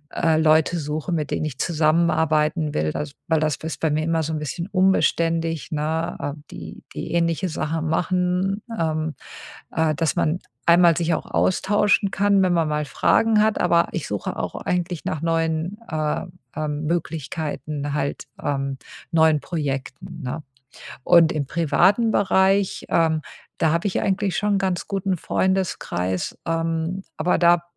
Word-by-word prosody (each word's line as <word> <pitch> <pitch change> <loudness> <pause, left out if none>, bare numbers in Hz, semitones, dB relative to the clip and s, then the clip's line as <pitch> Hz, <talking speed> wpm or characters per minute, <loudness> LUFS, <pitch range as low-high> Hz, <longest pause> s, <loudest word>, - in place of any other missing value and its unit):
äh, 160 -1 +2
Leute 160 +2 +3
suche, 155 +3 -3
mit 155 -4 -1
denen - - -1
ich 145 -4 -5
zusammenarbeiten 155 -1 +2
will. 75 0 0
Also, 145 -1 -4
weil 160 -1 +2
das 155 -2 +1
ist 160 0 -6
bei 160 - +1
mir 155 +1 0
immer 165 0 +1
so 160 +1 -3
'n - - -1
bisschen 165 +4 -4
unbeständig, 165 -4 +1
ne? 160 +2 -2
Äh, 145 - -2 0.2
die - - -9
die - - -5
ähnliche 170 +2 +1
Sachen 160 0 -2
machen, 180 +4 0 0.2
ähm, 155 -2 -1 0.6
äh, 160 -1 +2
dass 160 -2 0
man 160 +2 +1 0.3
einmal 170 -1 +6
sich 170 -1 +1
auch - - -5
austauschen 200 +1 +2
kann, 200 0 +3
wenn 180 -1 +2
man 165 -2 +2
mal 150 0 -1
Fragen 215 +9 +3
hat, 220 -1 +1
aber 170 -1 +3
ich 170 - -4
suche 105 -1 -3
auch - - -3
eigentlich 175 -2 -2
nach 155 - -2
neuen, 165 +3 0
äh, 155 -1 -1 0.4
ähm, 150 -1 -2
Möglichkeiten 150 -2 -3
halt, 140 -1 -2 0.2
ähm, 135 -1 -2 0.3
neuen 160 -2 +4
Projekten, 160 +2 -4
ne? 125 +5 -4 0.6
Und 170 -2 +6
im 150 -3 -2
privaten 180 - +3
Bereich, 195 0 +2
ähm, 160 -2 +2 0.4
da 160 - +3
habe 170 +4 0
ich 185 - -1
eigentlich 195 -2 0
schon 210 0 +1
'n - - +2
ganz 190 -2 -1
guten 195 -1 -1
Freundeskreis, 160 - -1
ähm, 165 +2 -1
aber 170 +3 +1
da 170 0 +5
165 Hz, 155 wpm, -23 LUFS, 155-180 Hz, 0.6 s, einmal